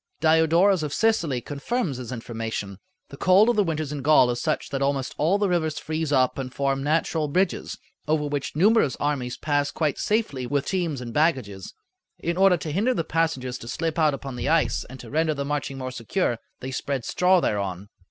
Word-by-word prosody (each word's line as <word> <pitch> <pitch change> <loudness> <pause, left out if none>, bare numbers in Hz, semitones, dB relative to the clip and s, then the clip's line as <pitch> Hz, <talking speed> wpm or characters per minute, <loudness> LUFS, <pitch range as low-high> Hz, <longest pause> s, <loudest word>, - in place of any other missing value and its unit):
Diodorus 160 +4 +4
of 150 -2 -3
Sicily 170 - +1
confirms 145 - -3
this 125 -1 -7
information: 115 -4 -5 0.3
"The 140 - -10
cold 190 +8 +5
of 240 - +2
the 210 - +3
winters 155 -4 -2
in 145 -2 -4
Gaul 140 -3 +5
is 120 - -3
such 155 - -1
that 135 -1 -3
almost 135 -2 0
all 165 +7 +3
the 205 -1 +1
rivers 160 -4 0
freeze 155 0 -3
up 130 -1 +2
and 130 -1 -4
form 135 0 -1
natural 155 +1 0
bridges, 180 +5 -1 0.3
over 150 -1 +1
which 145 -2 -3
numerous 200 - +3
armies 130 -4 -2
pass 145 -1 0
quite 150 -1 -1
safely 145 - -1
with 140 +2 0
teams 170 -8 -1
and 120 -2 -7
baggages; 130 - 0 0.4
in 170 0 -2
order 190 -1 +5
to 155 -1 -5
hinder 220 - +1
the 165 - 0
passengers 135 -7 -1
to 115 - -10
slip 165 +6 -2
out 155 -3 +3
upon 135 -2 -7
the - - -2
ice 165 -1 +2
and 130 +1 -11
to - - -11
render 155 +1 +1
the 140 0 -3
marching 140 -2 -3
more 130 -1 -4
secure, 120 - -1 0.2
they 130 +1 -5
spread 130 -1 -3
straw 180 0 +3
thereon." 100 - -2
145 Hz, 200 wpm, -25 LUFS, 130-165 Hz, 0.4 s, cold